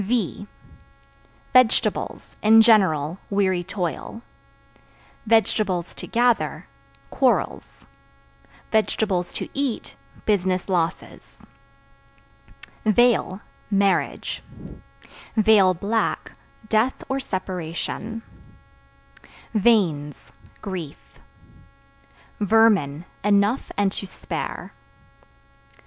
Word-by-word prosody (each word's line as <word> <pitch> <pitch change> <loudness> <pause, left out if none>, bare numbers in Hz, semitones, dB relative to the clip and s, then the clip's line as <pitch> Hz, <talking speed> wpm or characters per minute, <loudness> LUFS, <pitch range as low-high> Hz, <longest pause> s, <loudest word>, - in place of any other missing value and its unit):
V 205 -1 -2 1.1
Vegetables 255 -3 +2
(In 220 +1 +7
general) 185 -7 +3
weary 190 -3 +1
toil; 180 - -5 1.1
(to 205 -6 +1
gather) 230 - +1 0.5
quarrels; 260 -2 0 0.9
(to 205 -4 0
eat) 275 -4 -3 0.3
business 185 -3 +1
losses. 175 -4 -3 1.5
Veil 220 -3 +2 0.3
Marriage; 200 -1 0 1.0
(black) 210 0 +2 0.4
death 220 +4 +1
or 270 0 -1
separation. 190 +2 -5 1.3
Veins 185 -10 +1 0.3
Grief. 180 -8 -7 1.2
Vermin 200 -8 +3 0.2
Enough 205 +4 +2
and 200 -1 +2
to 195 - -5
spare. - - -6
200 Hz, 60 wpm, -23 LUFS, 180-225 Hz, 1.5 s, In